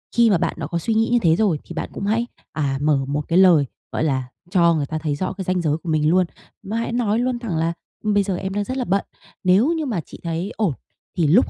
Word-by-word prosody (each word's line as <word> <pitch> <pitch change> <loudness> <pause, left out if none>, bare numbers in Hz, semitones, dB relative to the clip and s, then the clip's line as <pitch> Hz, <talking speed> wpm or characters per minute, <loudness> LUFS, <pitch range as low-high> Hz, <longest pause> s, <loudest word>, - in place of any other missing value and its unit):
khi 235 -1 +5
mà 195 - +4
bạn - - 0
đã - - -3
có 170 - -2
suy 225 +6 -1
nghĩ 225 +1 +2
như 240 - +4
thế 165 -3 +4
rồi 190 -7 +2
thì 170 - -9
bạn - - -4
cũng - - -4
hãy, 225 +3 +1 0.3
à, 140 -3 -1
mở 145 -2 +2
một 145 +1 -1
cái 170 - +2
lời, 175 -6 +6 0.3
gọi - - -1
là, 130 -4 0 0.2
cho 170 -3 +5
người 145 -3 0
ta 155 +2 -4
thấy 155 -2 -1
rõ 185 +6 -2
cái 190 - -5
ranh 185 -1 +1
giới 155 -2 +1
của 165 +1 -8
mình 155 -1 +2
luôn, 185 +1 +4 0.4
mà 210 +4 -3
hãy 230 - -2
nói 230 -2 +1
luôn 245 0 0
thẳng 210 -9 -3
là 165 +1 +1 0.3
"Bây 205 -2 +3
giờ 190 -2 -1
em 190 0 -4
đang 205 +1 0
rất 260 +5 -4
là 255 - -1
bận, 195 +1 +1 0.4
nếu 200 - +4
như 320 -2 -2
mà 215 -10 -1
chị - - -13
thấy 170 +4 -2
ổn 200 -10 +1 0.4
thì 165 -3 +3
lúc 185 - +5
185 Hz, 275 wpm, -22 LUFS, 160-220 Hz, 0.4 s, lời